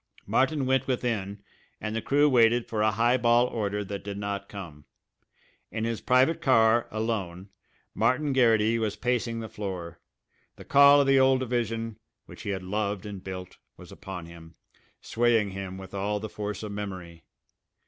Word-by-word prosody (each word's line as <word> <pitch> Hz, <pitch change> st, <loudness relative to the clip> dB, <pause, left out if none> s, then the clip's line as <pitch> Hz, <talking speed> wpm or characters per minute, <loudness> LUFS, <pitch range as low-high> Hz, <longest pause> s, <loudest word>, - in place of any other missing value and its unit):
Martin 135 Hz, +1 st, +1 dB
went 130 Hz, 0 st, +1 dB
within 105 Hz, -6 st, -2 dB, 0.4 s
and 110 Hz, 0 st, -4 dB
the 115 Hz, -, -1 dB
crew 145 Hz, +5 st, +3 dB
waited 120 Hz, -3 st, +4 dB
for 110 Hz, -2 st, -2 dB
a 110 Hz, -, +4 dB
high 115 Hz, +4 st, +2 dB
ball 120 Hz, 0 st, +4 dB
order 105 Hz, -4 st, -2 dB
that 100 Hz, 0 st, -6 dB
did 100 Hz, 0 st, -6 dB
not 100 Hz, 0 st, -4 dB
come. 85 Hz, -8 st, -9 dB, 0.8 s
In 110 Hz, -, -4 dB
his 115 Hz, -1 st, -2 dB
private 130 Hz, +6 st, +3 dB
car, 115 Hz, -3 st, +4 dB
alone, 100 Hz, -4 st, -3 dB, 0.4 s
Martin 130 Hz, +6 st, +1 dB
Garrity 115 Hz, -3 st, +3 dB
was 110 Hz, -2 st, -1 dB
pacing 120 Hz, -2 st, -1 dB
the 110 Hz, -, -6 dB
floor. 95 Hz, -6 st, -6 dB, 0.6 s
The -, -, -13 dB
call 140 Hz, 0 st, +7 dB
of -, -, +2 dB
the 135 Hz, 0 st, +4 dB
old 130 Hz, 0 st, +4 dB
division, 115 Hz, -3 st, -2 dB, 0.3 s
which -, -, -12 dB
he 105 Hz, -, -5 dB
had 95 Hz, -2 st, -3 dB
loved 105 Hz, +1 st, -2 dB
and 100 Hz, -3 st, -7 dB
built, 95 Hz, -1 st, -8 dB, 0.2 s
was -, -, -13 dB
upon 90 Hz, -3 st, -8 dB
him, 85 Hz, -1 st, -13 dB, 0.5 s
swaying 115 Hz, -3 st, +1 dB
him 95 Hz, -1 st, -6 dB
with 95 Hz, 0 st, -11 dB
all 100 Hz, +1 st, -1 dB
the 110 Hz, +1 st, -6 dB
force 105 Hz, -1 st, -5 dB
of 105 Hz, -, -5 dB
memory. 95 Hz, -5 st, -7 dB
110 Hz, 170 wpm, -27 LUFS, 100-120 Hz, 0.8 s, call